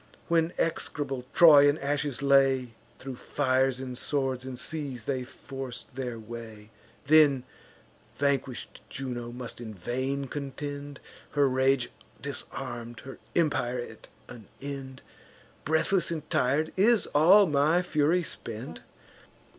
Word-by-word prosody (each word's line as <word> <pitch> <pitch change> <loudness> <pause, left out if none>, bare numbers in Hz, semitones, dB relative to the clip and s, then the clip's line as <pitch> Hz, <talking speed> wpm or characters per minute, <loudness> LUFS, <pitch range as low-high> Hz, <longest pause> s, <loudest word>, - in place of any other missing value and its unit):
When 165 0 +3
execrable 140 -5 -2
Troy 145 -4 +8
in 145 - +1
ashes 140 -1 -2
lay, 135 -3 +4 0.2
Thro' 135 0 -7
fires 130 0 +1
and 130 -1 -5
swords 130 -1 -1
and 130 -1 -6
seas 135 -6 -4
they 130 -2 -1
forc'd 130 -1 -8
their 125 -3 -4
way. 110 -1 -9 0.3
Then 145 -3 +5 0.7
vanquish'd 140 -3 -1
Juno 120 -3 -5
must 120 -1 -7
in 110 -2 -7
vain 130 +8 -2
contend, 145 +1 -6 0.3
Her 145 -1 +4
rage 130 -1 +2 0.3
disarm'd, 120 0 -6
her 135 - -10 0.2
empire 140 -7 +1
at 120 - -8 0.2
an 110 -4 -11
end. 135 -2 -7 0.6
Breathless 160 +5 +2
and 160 -3 -4
tir'd, 145 +5 +1
is 215 +3 +4
all 185 +8 +7
my 155 +3 +3
fury 165 +1 +2
spent? 110 - -7
135 Hz, 120 wpm, -28 LUFS, 125-145 Hz, 0.7 s, Troy